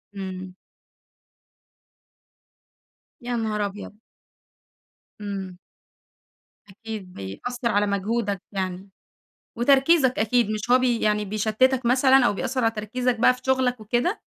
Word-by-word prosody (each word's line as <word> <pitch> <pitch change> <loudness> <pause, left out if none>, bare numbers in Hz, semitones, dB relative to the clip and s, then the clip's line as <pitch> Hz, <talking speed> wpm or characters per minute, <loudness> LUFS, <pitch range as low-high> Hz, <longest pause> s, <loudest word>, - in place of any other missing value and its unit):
إمم. 185 -1 -7 2.7
يا 240 0 -3
نهار 215 -2 -2
أبيض! 205 +1 -8 1.3
إمم. 195 -3 -5 1.1
أكيد 210 -2 -8
بيأثّر 235 - -4
على 205 0 +2
مجهودك 200 0 -1
يعني 190 -1 -4 0.7
وتركيزك 270 +2 +4
أكيد، 225 0 +2
مش 215 +1 -4
هو 255 - +6
بي 245 -2 +1
يعني 210 0 +1
بيشتتك 220 +5 +1
مثلًا 260 +1 +5
أو 240 - +2
بيأثّر 260 +4 -2
على 225 - +3
تركيزك 240 +3 -2
بقى 250 - +5
في 250 - -13
شُغلك 260 -2 +1
وكده؟ 240 - -1
225 Hz, 110 wpm, -24 LUFS, 200-250 Hz, 2.7 s, هو